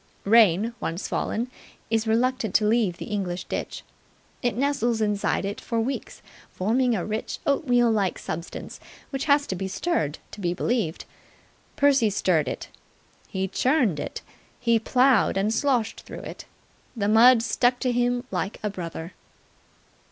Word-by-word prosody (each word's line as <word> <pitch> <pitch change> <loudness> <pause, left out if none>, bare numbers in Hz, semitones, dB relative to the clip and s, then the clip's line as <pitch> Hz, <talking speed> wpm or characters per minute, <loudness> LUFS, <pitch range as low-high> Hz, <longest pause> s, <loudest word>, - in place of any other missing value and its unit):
Rain, 215 0 +5
once 170 +5 -3
fallen, 235 +3 -2 0.4
is 225 0 +1
reluctant 230 -2 +1
to 215 - +4
leave 210 -5 +2
the - - -6
English 185 -4 -3
ditch. - - -5 0.6
It 245 -2 -1
nestles 245 -4 +1
inside 210 -2 0
it 200 +1 -4
for 230 -2 -2
weeks, 260 +4 -4 0.3
forming 235 +5 +1
a 180 - -2
rich, 215 +1 -3
oatmeal 245 -5 +3
like 200 -4 0
substance 165 +2 -6 0.3
which 270 0 -3
has 285 -1 +4
to - - -3
be 190 +1 -3
stirred 185 - -1
to 210 - -9
be 175 -1 0
believed. 220 -7 -1 0.7
Percy 275 -6 +4
stirred 175 -7 +1
it. - - -5 0.6
He 190 0 -2
churned 240 - +1
it. - - -5 0.4
He 235 -2 +3
ploughed 250 -2 +3
and 205 +3 +1
sloshed 235 -3 0
through - - -9
it. - - -9 0.5
The 200 -2 0
mud 230 +2 +6
stuck 245 +2 +2
to 250 - +1
him 245 0 +1
like 195 - -2
a 210 - -1
brother. 170 -2 -6
225 Hz, 150 wpm, -25 LUFS, 195-245 Hz, 0.7 s, mud